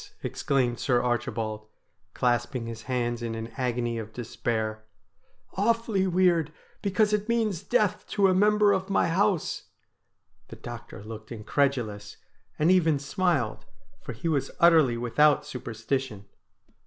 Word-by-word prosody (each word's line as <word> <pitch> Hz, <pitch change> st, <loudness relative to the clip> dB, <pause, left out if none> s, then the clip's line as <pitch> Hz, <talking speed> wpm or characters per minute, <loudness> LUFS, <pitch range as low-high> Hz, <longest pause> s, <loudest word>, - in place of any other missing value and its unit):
' -, -, -34 dB
exclaimed 125 Hz, -3 st, 0 dB
Sir 125 Hz, -3 st, +2 dB
Archibald, 110 Hz, -3 st, -2 dB, 0.5 s
clasping 120 Hz, 0 st, 0 dB
his 115 Hz, -1 st, -7 dB
hands 120 Hz, -2 st, -1 dB
in 115 Hz, -1 st, -3 dB
an 115 Hz, 0 st, -5 dB
agony 120 Hz, -3 st, -1 dB
of 110 Hz, 0 st, -8 dB
despair; 110 Hz, -2 st, -3 dB, 0.4 s
' -, -, -40 dB
awfully 215 Hz, -2 st, +1 dB
weird, 175 Hz, -4 st, +2 dB, 0.3 s
because 210 Hz, +1 st, +2 dB
it 210 Hz, +2 st, 0 dB
means 220 Hz, -7 st, +1 dB
death 210 Hz, -1 st, 0 dB
to 200 Hz, -, +1 dB
a 185 Hz, -, +3 dB
member 210 Hz, +2 st, +4 dB
of 190 Hz, 0 st, -2 dB
my 195 Hz, -, +2 dB
house.' 190 Hz, 0 st, 0 dB, 0.8 s
The -, -, -10 dB
doctor 100 Hz, -, -9 dB
looked 110 Hz, +1 st, -9 dB
incredulous, 110 Hz, -3 st, -1 dB, 0.4 s
and 155 Hz, +4 st, +3 dB
even 165 Hz, -5 st, +4 dB
smiled, 140 Hz, -, -1 dB, 0.4 s
for -, -, -6 dB
he 115 Hz, +9 st, -5 dB
was 140 Hz, -4 st, 0 dB
utterly 160 Hz, -8 st, +5 dB
without 145 Hz, +5 st, +3 dB
superstition. 120 Hz, -3 st, -4 dB
130 Hz, 135 wpm, -27 LUFS, 115-185 Hz, 0.8 s, utterly